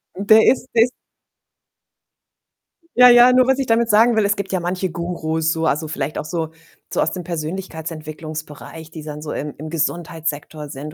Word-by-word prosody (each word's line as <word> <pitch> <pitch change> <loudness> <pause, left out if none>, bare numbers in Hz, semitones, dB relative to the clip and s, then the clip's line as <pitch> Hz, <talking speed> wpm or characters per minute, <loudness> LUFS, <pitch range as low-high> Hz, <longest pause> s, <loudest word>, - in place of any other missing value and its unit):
der 215 +3 +5
ist 255 -1 +2
der 225 -1 +6
ist 245 - -1 2.1
Ja, 250 0 +9
ja, 245 +1 +8
nur 255 0 +4
was 265 - +3
ich 270 -2 -2
damit 230 0 +2
sagen 220 +2 +4
will, 215 - +3
es 205 +1 +2
gibt 200 -1 -5
ja 185 - 0
manche 180 +1 -2
Gurus 160 -2 -2
so, 160 0 -2
also 155 +1 0
vielleicht 150 -1 -4
auch - - -4
so 160 -1 -3 0.4
so - - -1
aus - - +1
dem 180 - -5
Persönlichkeitsentwicklungsbereich, 160 -2 -7
die 160 -1 -8
dann 150 0 -7
so 150 - -6
im 150 0 -4
im 155 +2 -7
Gesundheitssektor 155 -2 -3
sind, 150 +1 -8
165 Hz, 180 wpm, -20 LUFS, 155-205 Hz, 2.1 s, Ja